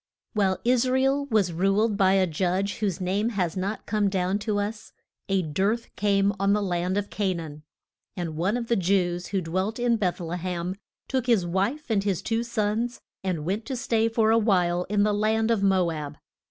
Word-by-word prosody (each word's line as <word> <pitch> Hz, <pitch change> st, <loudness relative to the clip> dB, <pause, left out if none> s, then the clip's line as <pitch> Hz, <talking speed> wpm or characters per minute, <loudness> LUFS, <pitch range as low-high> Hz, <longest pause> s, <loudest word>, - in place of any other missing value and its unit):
WHILE 195 Hz, -4 st, +2 dB
Is 250 Hz, +1 st, +3 dB
ra 260 Hz, -, +2 dB
el 270 Hz, +2 st, +2 dB
was 210 Hz, -8 st, +1 dB
ruled 195 Hz, +5 st, +2 dB
by 190 Hz, -2 st, +4 dB
a 190 Hz, -1 st, +4 dB
judge 185 Hz, +4 st, -1 dB
whose 200 Hz, -4 st, -1 dB
name 195 Hz, +5 st, 0 dB
has 185 Hz, -6 st, -1 dB
not 195 Hz, +3 st, -3 dB
come 210 Hz, -1 st, +1 dB
down 190 Hz, +1 st, 0 dB
to 210 Hz, -1 st, -1 dB
us, 210 Hz, +2 st, -4 dB, 0.4 s
a 195 Hz, -1 st, +2 dB
dearth 195 Hz, +9 st, -1 dB
came 200 Hz, -1 st, +2 dB
on 195 Hz, +1 st, +3 dB
the 210 Hz, -, +1 dB
land 180 Hz, 0 st, -1 dB
of 205 Hz, 0 st, -2 dB
Ca 195 Hz, -3 st, 0 dB
naan. 155 Hz, -3 st, -7 dB, 0.6 s
And 170 Hz, -3 st, -3 dB
one 190 Hz, +8 st, 0 dB
of 240 Hz, -, -3 dB
the 235 Hz, -, +2 dB
Jews 180 Hz, -2 st, +1 dB
who 195 Hz, -2 st, -1 dB
dwelt 185 Hz, +6 st, -2 dB
in 240 Hz, -1 st, +2 dB
Beth 185 Hz, -4 st, -1 dB
le 170 Hz, 0 st, -4 dB
hem, 180 Hz, 0 st, -3 dB, 0.3 s
took 260 Hz, -2 st, -1 dB
his 220 Hz, -7 st, +3 dB
wife 205 Hz, -, -1 dB
and 200 Hz, -3 st, +2 dB
his 195 Hz, -2 st, -1 dB
two 225 Hz, +2 st, 0 dB
sons 235 Hz, +1 st, -1 dB, 0.2 s
and 175 Hz, -5 st, -2 dB
went 200 Hz, +6 st, -1 dB
to 265 Hz, -, -2 dB
stay 230 Hz, -3 st, +1 dB
for 225 Hz, -1 st, +2 dB
a 225 Hz, -, +5 dB
while 180 Hz, -5 st, +2 dB
in 205 Hz, +1 st, +1 dB
the 210 Hz, 0 st, +2 dB
land 220 Hz, +2 st, +1 dB
of 225 Hz, -3 st, +1 dB
Mo 190 Hz, -3 st, +3 dB
ab. 150 Hz, -2 st, -6 dB
200 Hz, 205 wpm, -26 LUFS, 180-220 Hz, 0.6 s, a